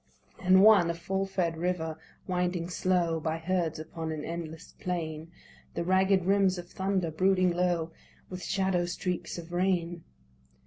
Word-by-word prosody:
And 190 +1 +6
one, 205 -5 +7
a 170 - -1
full 190 +3 -2
fed 175 -4 -1
river 165 -2 -1 0.3
winding 180 -1 -1
slow 175 -2 +1
By 160 0 -2
herds 165 -1 -1
upon 160 +1 -5
an 155 -1 -4
endless 165 -1 -6
plain, 165 -2 -4 0.4
The - - -1
ragged 190 +1 +3
rims 195 -1 +3
of 175 0 -8
thunder 190 -3 -1
brooding 185 +2 +3
low, 175 -2 0 0.4
With 185 -1 -7
shadow 190 -3 0
streaks 180 0 -3
of 170 0 -8
rain. 175 -2 0
175 Hz, 145 wpm, -29 LUFS, 165-185 Hz, 0.4 s, one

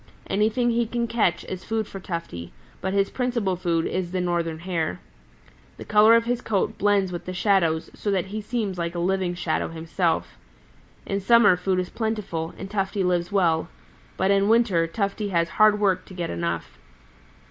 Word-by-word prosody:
Anything 220 +4 +1
he 235 0 +1
can 240 +1 -1
catch 230 -6 0
is 185 0 -6
food 225 -1 -1
for 195 - -8
Tufty, 165 - -6 0.3
but 190 - -1
his 195 0 +1
principal 235 -7 -1
food 170 -2 0
is 185 -2 -2
the 185 - -1
Northern 170 -2 -1
Hare. 165 - -2 0.8
The - - -9
color 215 +2 +6
of 230 0 +3
his 245 0 -1
coat 205 -5 -1
blends 200 -2 +2
with 175 - -6
the 185 - -5
shadows 180 -5 +1
so 210 - -4
that 190 -3 +1
he 215 - -2
seems 210 -4 -3
like 170 0 -3
a - - -2
living 185 0 0
shadow 170 -2 -1
himself. 165 +1 -2 0.7
In 200 -1 -1
summer 210 -1 +5
food 185 +1 -1
is 180 - -3
plentiful, 210 -8 -3
and 195 - -6
Tufty 195 0 -1
lives 180 0 0
well, 170 -5 +2 0.5
but 190 +1 +2
in 200 +1 +3
winder 215 -8 +3
Tufty 200 +3 -2
has 170 -2 +1
hard 215 +1 +4
work 190 -3 +1
to 185 - -12
get 175 -2 -3
enough. 85 -1 -4
190 Hz, 180 wpm, -24 LUFS, 170-210 Hz, 0.8 s, color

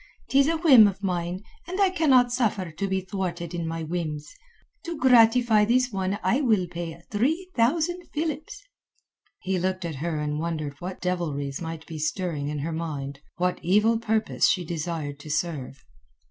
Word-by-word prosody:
'Tis 275 +1 +4
a 325 +1 +1
whim 270 -10 +8
of 200 0 -4
mine, 180 0 -2 0.2
and 370 +3 -4
I 390 -2 +4
cannot 265 -9 +4
suffer 210 -8 0
to 195 +6 -3
be 190 0 0
thwarted 180 -3 -4
in 170 -1 -3
my 165 0 -3
whims. 155 -3 -4 0.5
To 340 -2 -4
gratify 240 -3 +5
this 250 +3 +2
one 195 0 -1
I 255 +5 +2
will 220 -9 +3
pay 170 -1 -6
three 315 - 0
thousand 330 +9 +1
philips." 310 +6 -4 0.8
He 185 0 -1
looked 185 0 -1
at 160 -4 -4
her 160 +1 -2
and 150 0 -2
wondered 155 -3 -3
what 180 +1 -6
devilries 150 -6 -2
might 165 -1 -6
be 160 -2 -7
stirring 155 -2 -2
in 150 0 -3
her 165 - -3
mind, 145 -4 -4 0.2
what 180 0 0
evil 210 +6 +3
purpose 220 -1 +1
she 180 -3 +1
desired 160 -3 -4
to 150 - -10
serve. 145 -4 -3
185 Hz, 170 wpm, -26 LUFS, 165-240 Hz, 0.8 s, whim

